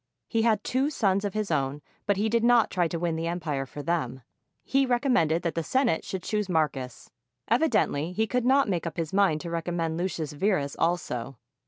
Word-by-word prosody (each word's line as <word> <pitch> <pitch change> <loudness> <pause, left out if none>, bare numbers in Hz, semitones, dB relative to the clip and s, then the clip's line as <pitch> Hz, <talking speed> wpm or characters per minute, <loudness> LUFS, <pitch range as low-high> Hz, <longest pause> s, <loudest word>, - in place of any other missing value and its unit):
He 225 - +1
had 220 -2 +2
two 265 +3 +1
sons 200 -8 +1
of 205 -1 -3
his 215 -4 -1
own, 140 -1 -1 0.2
but 205 -2 +2
he 210 +2 +1
did 230 +1 +1
not 240 -1 +4
try 175 -3 +1
to 170 - -3
win 170 -1 -1
the 165 +1 -2
empire 155 -6 -2
for 145 +2 -8
them. 135 -7 -2 0.4
He 275 +1 +2
recommended 245 - +2
that 170 - -1
the 165 - -1
Senate 245 - +1
should 190 -2 -5
choose 210 -2 -1
Marcus. 140 -7 -2 0.4
Evidently 225 - +2
he 220 +4 0
could 250 +3 -1
not 270 +2 +4
make 175 -4 -1
up 165 - -6
his 165 -1 -3
mind 190 -6 +3
to 170 - -6
recommend 165 -1 -2
Lucius 165 -5 -2
Verus 150 -4 0
also. 135 -7 -1
175 Hz, 200 wpm, -27 LUFS, 160-220 Hz, 0.4 s, not